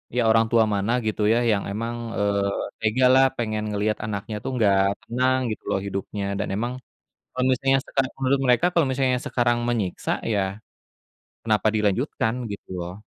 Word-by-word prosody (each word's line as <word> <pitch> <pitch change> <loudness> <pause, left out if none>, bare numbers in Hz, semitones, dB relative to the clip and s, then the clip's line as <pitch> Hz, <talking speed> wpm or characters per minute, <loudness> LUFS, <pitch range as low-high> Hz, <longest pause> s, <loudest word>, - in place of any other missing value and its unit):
ya 125 - +3
orang 115 0 +4
tua 115 -1 +4
mana 100 +3 0
gitu 110 0 -2
ya 120 - +3
yang 100 -2 +1
emang, 115 +3 -3 0.2
eee, 100 -1 0
tega 115 +4 +2
lah 135 0 +6
pengen 110 -2 -2
ngeliat 105 +1 0
anaknya 105 0 -4
itu - - -4
nggak 100 -4 +4 0.3
tenang 130 +2 +1
gitu 110 - -6
loh - - +1
hidupnya 100 +1 -4 0.2
dan - - -1
emang, 120 +4 -2 0.6
kalau 125 - -1
misalnya 135 +1 +2
misalnya 135 0 -1
menurut 135 +1 +1
mereka 125 +6 +4
kalau 170 -4 +3
misalnya 130 -1 +1
sekarang 120 -1 +1
menyiksa 105 -7 -2 0.2
ya, 100 - +2 1.0
kenapa 110 -1 +1
dilanjutkan 110 +2 0 0.2
gitu 100 - -8
loh. 90 +4 -7
110 Hz, 165 wpm, -24 LUFS, 105-125 Hz, 1.0 s, lah